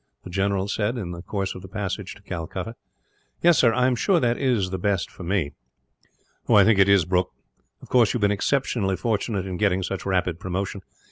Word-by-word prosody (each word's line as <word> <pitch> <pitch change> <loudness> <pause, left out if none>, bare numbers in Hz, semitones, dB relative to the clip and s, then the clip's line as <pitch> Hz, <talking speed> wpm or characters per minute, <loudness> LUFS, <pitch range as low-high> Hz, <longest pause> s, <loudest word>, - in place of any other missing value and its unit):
the 90 - -9
general 100 +1 0
said, 105 +4 -1
in 95 -7 -4
the 85 0 -7
course 95 +1 -3
of 95 - -9
the 95 - -10
passage 100 -1 -4
to 100 - -18
Calcutta. 95 +5 -5 0.7
"Yes, 170 -1 +5
sir. 120 - +5
I 125 +2 +2
am 130 -1 +2
sure 180 - +2
that 120 -4 +1
it - - -8
is 120 -8 +2
best 95 0 -1
for - - -13
me." 90 -5 -1 1.0
"I 100 - +7
think 110 -1 +4
it 95 0 +5
is, 100 -4 +5
Brooke. 90 +1 +1 0.5
Of - - -13
course, 120 -5 +4
you - - -1
have - - -6
been 105 0 +3
exceptionally 105 -2 0
fortunate 105 -3 -1
in 95 -2 -4
getting 95 -2 +1
such 95 +1 -4
rapid 90 -3 0
promotion. 95 +2 -3
100 Hz, 210 wpm, -24 LUFS, 95-110 Hz, 1.0 s, I